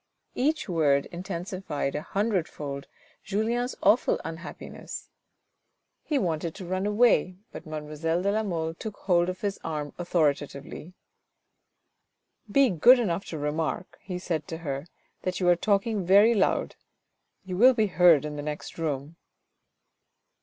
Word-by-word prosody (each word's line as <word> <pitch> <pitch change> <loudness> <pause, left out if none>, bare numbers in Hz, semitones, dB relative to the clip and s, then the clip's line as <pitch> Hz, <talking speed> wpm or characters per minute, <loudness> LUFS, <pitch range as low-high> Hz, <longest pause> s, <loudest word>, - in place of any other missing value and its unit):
Each 300 +3 0
word 150 -6 +2
intensified 180 -5 -4
a 150 - -2
hundredfold 160 -9 -2 0.4
Julien's 230 +5 -1
awful 210 +5 +4
unhappi 165 +1 -7
ness. - - -8 0.9
He 300 - -1
wanted 165 - -1
to 190 - -8
run 185 +3 -1
away, 210 -5 +3
but - - -9
mademoiselle 155 +3 -2
de 200 - +2
la 215 +1 +1
Mole 165 -6 -2
took 210 +5 -7
hold 175 -2 +2
of 185 - -5
his 200 -1 -2
arm 150 -2 -4
authoritatively. 150 -1 -1 0.8
" 215 - -27
Be 275 0 +5
good 240 +10 +7
enough 195 -5 -1
to 160 - -6
remark," 155 +4 -3
he 180 -2 -5
said 165 -4 -3
to 160 - -5
her, 140 +2 -3 0.2
" - - -43
that 185 0 -2
you 180 - +1
are 175 - +6
talking 200 +2 +1
very 200 +6 +6
loud. 200 -4 +1 0.7
You 185 -1 -4
will 255 +5 +7
be 220 -2 +3
heard 175 -6 +5
in 150 -1 -5
the - - -3
next 150 +2 -6
room." 150 0 -3
175 Hz, 145 wpm, -27 LUFS, 155-200 Hz, 0.9 s, good